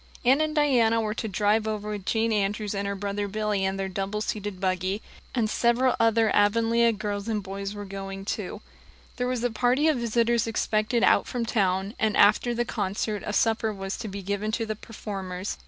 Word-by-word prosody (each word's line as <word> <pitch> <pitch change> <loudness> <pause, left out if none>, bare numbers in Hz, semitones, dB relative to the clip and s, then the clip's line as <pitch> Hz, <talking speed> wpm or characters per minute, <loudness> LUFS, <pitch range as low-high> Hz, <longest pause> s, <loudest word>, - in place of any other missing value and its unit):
Anne 265 +5 +5
and 310 0 -1
Diana 245 -7 +3
were 215 -1 -1
to 220 - -4
drive 210 +2 +1
over 210 -1 -3
with 205 -2 -6
Jane 225 0 +1
Andrews 205 0 -1
and 200 0 -2
her 200 - -2
brother 200 +1 -3
Billy 210 -1 -1
in 190 0 0
their 195 0 -2
double 195 +2 -3
seated 205 -3 -4
buggy; 185 +1 0 0.4
and 230 -3 +2
several 240 +3 +2
other 225 -1 +3
Avonlea 230 +3 +3
girls 205 -1 -4
and 215 -3 -1
boys 195 +1 -5
were 205 0 -6
going 195 0 -6
too. - - -4 0.6
There 250 -1 0
was 250 -2 -2
a 245 - +1
party 250 +6 +2
of 310 -4 +3
visitors 235 0 +1
expected 220 +1 0
out - - +4
from 240 -2 -2
town, 195 -3 0
and 215 -2 +1
after 235 +4 +4
the 240 +1 0
concert 205 0 -2
a - - -1
supper 220 +1 +1
was 195 -1 -4
to - - -5
be 200 -1 -6
given 205 +2 -2
to 225 0 0
the 215 0 -3
performers. 195 -3 -6
215 Hz, 200 wpm, -26 LUFS, 200-230 Hz, 0.6 s, Anne